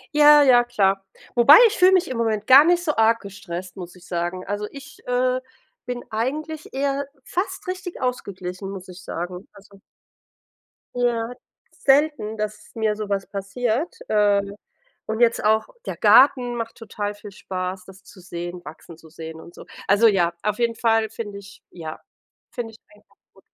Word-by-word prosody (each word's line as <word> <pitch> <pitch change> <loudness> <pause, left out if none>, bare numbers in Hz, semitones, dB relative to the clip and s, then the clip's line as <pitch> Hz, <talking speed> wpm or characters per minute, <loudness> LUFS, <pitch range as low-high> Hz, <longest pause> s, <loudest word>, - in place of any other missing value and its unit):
Ja, 295 0 +8
ja, 245 -3 +6
klar. 195 -5 0 0.3
Wobei, 245 +5 +8
ich 435 - -3
fühle 365 +1 +6
mich 370 -4 +3
im 255 - -4
Moment 215 -2 -1
gar 270 +3 +9
nicht 350 +1 +2
so 305 -4 -1
arg 225 +1 +3
gestresst, 185 -3 -8
muss 180 -1 -9
ich 180 - -17
sagen, 175 +1 -3
also, 205 +1 -3
ich, 280 -1 -12
äh, 255 +1 +1 0.4
bin 245 -1 -5
eigentlich 300 +8 -4
eher 275 +1 -1 0.2
fast 360 +7 -4
richtig 365 -1 -6
ausgeglichen, 195 -6 -4
muss 195 -1 -8
ich 180 +1 -11
sagen. 180 +2 -6
Also 200 0 -18 1.2
Ja, 240 -1 0 0.4
selten, 270 -6 +1
dass 215 0 -5
mir 220 -2 0
so 210 -1 -6
was 195 -1 -2
passiert. 235 - -2
Äh, 205 -1 +3 0.6
und 220 0 -3
jetzt 235 -1 +3
auch 220 +1 +2 0.2
der - - -4
Garten 250 -3 +5
macht 230 -1 -5
total 210 -2 -5
viel 205 0 -12
Spaß, 185 0 -5
das 190 0 -15
zu 195 - -16
sehen 175 0 -7
wachsen 160 +2 -11
zu 160 - -17
sehen 160 0 -9
und 170 - -13
so. - - -12 0.2
Also, 205 +4 +5
ja, 175 -5 +2
auf 210 +1 -1
jeden 235 -1 +1
Fall 225 -1 +1
finde 210 -2 -7
ich 200 0 -15
ja, 160 -3 -8 0.5
finde 235 -2 -5
ich 225 - -15 0.2
einfach 210 - -27 0.2
gut. - - -21
215 Hz, 170 wpm, -23 LUFS, 195-250 Hz, 1.2 s, gar